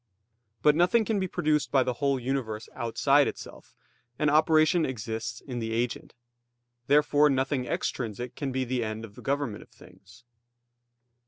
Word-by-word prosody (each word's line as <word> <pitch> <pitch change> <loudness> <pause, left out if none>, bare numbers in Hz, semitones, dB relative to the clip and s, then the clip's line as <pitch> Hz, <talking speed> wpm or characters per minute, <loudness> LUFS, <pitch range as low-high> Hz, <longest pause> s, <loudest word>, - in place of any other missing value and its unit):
But 150 0 +5
nothing 180 +7 +3
can 215 -2 0
be 190 - -1
produced 150 -7 0
by 135 -2 +4
the 125 - -1
whole 140 -2 +1
universe 120 -4 -3
outside 135 +5 +2
itself; - - -9 0.4
and 150 -1 +2
operation 155 +2 +4
exists 115 -3 -4
in 125 -3 -6
the 115 -1 -3
agent. 120 +1 -3 0.7
Therefore 150 +1 +4
nothing 135 -1 0
extrinsic 120 0 -3
can 140 -2 -4
be 130 0 -1
the 125 -1 -1
end 110 +1 -4
of 105 - -15
the - - -13
government 140 -6 -2
of - - -16
things. 95 +5 -18
130 Hz, 155 wpm, -27 LUFS, 115-150 Hz, 0.7 s, But